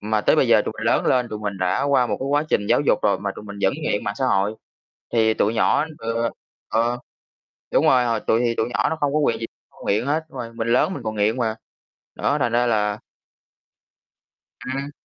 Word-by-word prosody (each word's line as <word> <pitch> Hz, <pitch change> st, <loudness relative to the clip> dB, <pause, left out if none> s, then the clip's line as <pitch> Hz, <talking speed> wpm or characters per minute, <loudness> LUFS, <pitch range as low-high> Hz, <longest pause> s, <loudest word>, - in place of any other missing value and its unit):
Mà 110 Hz, 0 st, 0 dB
tới -, -, +3 dB
bây -, -, +3 dB
giờ -, -, +5 dB
tụi -, -, -3 dB
mình -, -, -3 dB
lớn -, -, +2 dB
lên, 125 Hz, -2 st, +2 dB
tụi 105 Hz, -, -5 dB
mình 100 Hz, -2 st, -4 dB
đã 90 Hz, -1 st, 0 dB
qua 140 Hz, -3 st, +3 dB
một -, -, -2 dB
cái 135 Hz, -, -2 dB
quá 145 Hz, +2 st, +1 dB
trình 100 Hz, -, +1 dB
giáo -, -, +4 dB
dục 145 Hz, -, +2 dB
rồi, 100 Hz, -2 st, +2 dB
mà 100 Hz, 0 st, -2 dB
tụi 105 Hz, -, -9 dB
mình 100 Hz, -1 st, -9 dB
vẫn 95 Hz, -, +3 dB
nghiện 105 Hz, -9 st, -1 dB
mạng 100 Hz, -, -2 dB
xã 130 Hz, -, +1 dB
hội. 100 Hz, 0 st, +1 dB, 0.6 s
Thì 110 Hz, -1 st, +3 dB
tụi 110 Hz, +3 st, +1 dB
nhỏ 115 Hz, +6 st, +3 dB
ừ, 115 Hz, +1 st, -1 dB, 0.4 s
ờ, 120 Hz, +2 st, +1 dB, 0.7 s
đúng -, -, +3 dB
rồi, 125 Hz, -1 st, +5 dB
họ 115 Hz, -2 st, 0 dB
tụi 110 Hz, +2 st, +1 dB
thì 120 Hz, -1 st, +1 dB
tụi 110 Hz, -, 0 dB
nhỏ 125 Hz, -, 0 dB
nó 160 Hz, -, -1 dB
không 145 Hz, -1 st, +1 dB
có -, -, +3 dB
quyền 120 Hz, -7 st, +1 dB
gì 115 Hz, -, -3 dB, 0.2 s
không -, -, -13 dB
nghiện 105 Hz, +5 st, +1 dB
hết, 155 Hz, +3 st, 0 dB
đúng 135 Hz, -, -11 dB
rồi. 115 Hz, -2 st, -6 dB
Mình 115 Hz, 0 st, -3 dB
lớn 125 Hz, +10 st, +2 dB
mình 140 Hz, -, -7 dB
còn 110 Hz, -1 st, -3 dB
nghiện 105 Hz, +3 st, +1 dB
mà. 115 Hz, -3 st, 0 dB, 0.6 s
Đó, 145 Hz, -, 0 dB
thành 120 Hz, -3 st, +1 dB
ra 120 Hz, +1 st, +2 dB
là 105 Hz, -2 st, +1 dB, 1.7 s
Ừm. 135 Hz, +2 st, -4 dB
115 Hz, 240 wpm, -22 LUFS, 105-130 Hz, 1.7 s, giờ